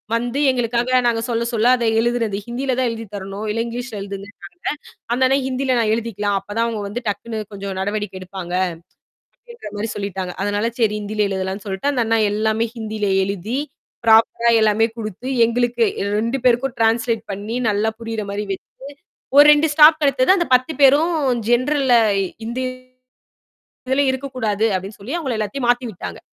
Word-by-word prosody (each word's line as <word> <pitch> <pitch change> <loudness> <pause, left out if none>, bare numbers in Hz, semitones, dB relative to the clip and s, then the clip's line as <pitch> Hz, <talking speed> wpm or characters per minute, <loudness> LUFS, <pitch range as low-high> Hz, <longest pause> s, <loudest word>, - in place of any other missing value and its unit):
வந்து 240 +4 -2
எங்களுக்காக 245 +1 +1
நாங்க 225 -1 +1
சொல்ல, 235 0 0
சொல்ல 230 +2 +3
அதை 235 -1 0
எழுதிறது, 230 -4 0
ஹிந்தில 255 +2 -2
தான் 250 -2 +2
எழுதி 225 0 -6
தரணும், 195 +2 -6
இல்லை 230 +2 -1
இங்கிலீஷ்ல 240 -1 -6
எழுதுங்கன்ட்டாங்க 200 0 -9 0.7
அந்த 260 - +1
அண்ணன் 270 +1 +1
ஹிந்தியில 260 0 0
நான் 220 -2 +2
எழுதிக்கலாம். 205 -3 -2
அப்ப - - -35
தான் 230 - +2
அவுங்க 220 -3 -3
வந்து 240 +5 -5
டக்குனு 220 +2 -4
கொஞ்சம் 195 -1 -5
நடவடிக்கை 205 -1 -3
எடுப்பாங்க 185 -1 -7 0.8
அப்பிடின்ற 475 - -11
மாரி 215 +2 -3
சொல்லிட்டாங்க. 190 -3 -4
அதனால 205 +3 0
சரி 215 -2 +2
ஹிந்தியில 210 0 -1
எழுதலான்னு 190 +1 -4
சொல்ட்டு, 190 +8 -1
அந்த 245 -3 +1
அண்ணா 225 0 +2
எல்லாமே 220 +2 0
ஹிந்தியில 215 -2 -3 0.2
எழுதி 200 +6 -3 0.5
ப்ராப்பரா 225 +1 +5
எல்லாமே 215 +1 +3
கொடுத்து, 220 +2 -6 0.2
எங்களுக்கு 240 0 0
ஏ - - -12 0.2
2 230 +6 0
பேருக்கும் 245 +1 +2
டிரான்ஸ்லேட் 225 0 +1
பண்ணி 205 +4 -5 0.2
நல்லா 210 +2 +1
புரியிறமாரி 210 -2 -4
வச்சு, 195 - -4 0.7
ஒரு 290 - +10
2 300 +2 +5
ஸ்டாப் 310 +1 +7
கிடைத்தது. 275 +1 +3
அந்த 345 - 0
10 255 +5 +2
பேரும் 290 +5 +5 0.4
ஜென்ரல்ல 260 +1 +3 0.5
ஹிந்தி 235 +3 -3 1.3
இதில 265 +2 +2
இருக்கக்கூடாது 255 -6 -2
அப்பிடின்னு 190 +3 -4
சொல்லி 230 +10 -6
அவுங்கள 270 -8 -2
எல்லாத்தையும் 215 +5 -3
மாத்தி 245 +1 +2
விட்டாங்க. 180 - -7
225 Hz, 155 wpm, -20 LUFS, 205-250 Hz, 1.3 s, ஒரு